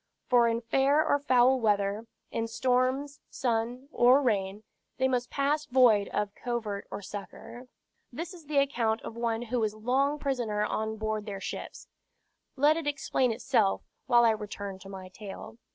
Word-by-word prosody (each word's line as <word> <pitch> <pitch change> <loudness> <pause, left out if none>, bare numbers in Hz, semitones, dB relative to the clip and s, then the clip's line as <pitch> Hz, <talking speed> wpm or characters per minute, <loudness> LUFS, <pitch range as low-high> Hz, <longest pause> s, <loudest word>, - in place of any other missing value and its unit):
For 240 -2 +4
in 230 0 0
fair 270 +6 +2
or 285 - +3
foul 260 -1 +4
weather, 205 0 0 0.2
in 230 0 -2
storms, 255 +4 0
sun, 240 +2 -2
or 250 +1 +5
rain, 205 -3 -1 0.3
they 260 - +2
must 250 -2 -1
pass 295 +2 0
void 240 -6 +4
of 205 -1 -2
covert 225 -5 -4
or 205 - -6
succor." 230 +5 -9 0.4
This 330 +8 -6
is 340 -4 -13
the 295 -1 -1
account 235 -5 +1
of 230 - -7
one 235 0 -1
who 245 +1 -2
was 215 -1 -1
long 265 +6 +1
prisoner 240 -7 -1
on 220 +1 -2
board 215 0 -3
their 200 -2 -5
ships; - - -7 0.7
let 295 +3 +4
it 325 -3 -4
explain 270 -3 0
itself, 225 -3 +1 0.2
while 240 -1 +5
I 230 - +5
return 205 -2 -5
to 195 - -12
my 190 -1 -8
tale. 200 +3 -10
235 Hz, 165 wpm, -29 LUFS, 215-265 Hz, 0.7 s, or